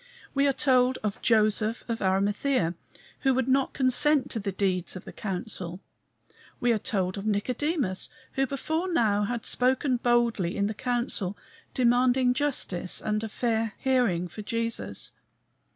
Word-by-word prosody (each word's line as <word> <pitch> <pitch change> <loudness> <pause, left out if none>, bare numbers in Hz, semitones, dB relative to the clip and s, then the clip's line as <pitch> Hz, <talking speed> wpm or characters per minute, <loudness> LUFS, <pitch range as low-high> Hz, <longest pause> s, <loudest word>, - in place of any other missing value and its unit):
We 280 0 +3
are - - +4
told 255 -1 +3
of 210 -2 -3
Joseph 215 0 +2
of 230 -1 -3
Arimathea, 200 +1 +1 0.5
who 265 -2 +2
would 260 -1 0
not 265 0 +2
consent 275 +2 +3
to 225 - -1
the 200 -1 -3
deeds 185 -2 -1
of 185 - -8
the - - -9
council. 185 -3 -4 0.8
We 240 - +2
are 220 - 0
told 190 -2 -1
of 200 - -5
Nicodemus, 240 - 0 0.2
who 270 0 0
before 315 +7 -2
now 210 -9 +2
had 235 +1 -3
spoken 255 +1 +2
boldly 235 -7 +1
in 200 - +1
the 210 - -1
council, 235 -5 -1 0.4
demanding 250 0 +3
justice 250 -11 -1
and 215 0 -1
a 225 - -3
fair 225 -1 -1
hearing 245 -10 +1
for 195 +5 -8
Jesus. 230 +2 -2
230 Hz, 150 wpm, -27 LUFS, 200-255 Hz, 0.8 s, are